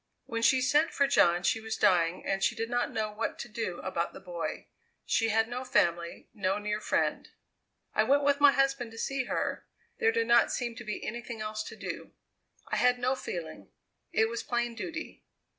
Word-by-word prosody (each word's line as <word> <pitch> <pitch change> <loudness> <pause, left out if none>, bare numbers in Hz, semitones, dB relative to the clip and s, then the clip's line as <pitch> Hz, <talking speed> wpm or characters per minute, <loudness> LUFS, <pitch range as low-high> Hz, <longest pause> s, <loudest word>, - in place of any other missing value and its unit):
"When 230 -1 -3
she 260 +2 +4
sent 295 +5 +3
for 280 - +2
John 175 -10 +4
she 225 - +1
was 220 0 -4
dying 170 -1 +3
and 195 0 -1
she - - +2
did 225 +1 -3
not 245 0 +1
know 215 -1 -2
what 210 - -3
to - - -6
do 225 0 -4
about - - -2
the - - -9
boy. - - -5 0.4
She 225 -1 +2
had 225 +1 +2
no 245 +2 -4
family 170 -9 0
no 195 -3 0
near 210 0 -2
friend. - - 0 0.6
"I - - +3
went 285 +1 +3
with 285 0 +3
my 290 -1 +8
husband 275 -3 +1
to - - -11
see 265 +2 -1
her. - - -2 0.3
There 450 -1 +4
did 455 0 +1
not 235 0 +5
seem 240 -2 -2
to 225 - -7
be 210 -1 -5
anything 235 0 -5
else 215 0 -3
to - - -8
do. - - -7 0.6
I - - 0
had 250 0 +4
no 250 +1 +1
feeling; 160 - -6 0.4
it 220 - +3
was 235 +1 -3
plain 240 -1 -1
duty. 320 +8 -6
235 Hz, 200 wpm, -30 LUFS, 210-260 Hz, 0.6 s, my